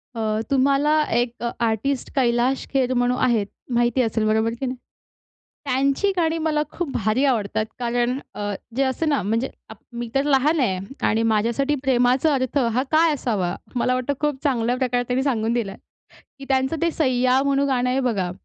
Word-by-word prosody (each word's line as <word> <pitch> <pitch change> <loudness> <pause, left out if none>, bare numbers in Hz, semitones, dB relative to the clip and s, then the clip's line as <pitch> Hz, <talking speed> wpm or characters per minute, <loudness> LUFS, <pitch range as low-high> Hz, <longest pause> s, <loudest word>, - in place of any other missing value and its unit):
अ, 220 -1 -1
तुम्हाला 280 +3 +3 0.2
एक 240 0 -3
अ, 235 - 0 0.2
आर्टिस्ट, 235 +5 -1
कैलाश 250 0 +1
खेर 260 -2 +2
म्हणून 245 0 +1
आहेत 220 -4 +1 0.3
माहिती 240 +2 +2
असेल, 225 -2 0
बरोबर 220 +1 +2
की 270 - -2
नाही? 255 0 -3 0.9
त्यांची 275 +8 +1
गाणी 330 -1 +1
मला 310 -2 0
खूप 340 -6 -4
भारी 220 +5 +1
आवडतात. 220 -4 0
कारण 245 +1 0 0.2
अ, 205 0 -3 0.2
जे 270 - +2
असतं 270 +4 0
ना 285 - +1
म्हणजे 230 +6 -1 0.2
आपण, 220 -2 -13
मी 235 -1 -4
तर 275 - +3
लहान 290 +3 +3
आहे 190 -8 +1 0.3
आणि 225 +1 +1
माझ्यासाठी 235 +7 +1
प्रेमाचा 260 +3 +3
अर्थ 260 0 -1 0.2
हा 255 +3 +1
काय 320 0 +4
असावा? 200 -10 -1 0.2
मला 250 +1 +1
वाटतं 255 +3 -1
खूप 295 -3 -2
चांगल्या 245 -4 +1
प्रकारे 245 -1 0
त्यांनी 255 +1 0
सांगून 230 -5 0
दिलाय, 225 -5 -2 0.6
की 275 - -9
त्यांचं 265 +3 +1
ते 335 - +3
सय्या 255 -4 +2
म्हणून 280 0 +1
गाणं 250 -2 +1
आहे 260 +1 +1
बघा. 205 -8 -1
255 Hz, 175 wpm, -22 LUFS, 235-275 Hz, 0.9 s, काय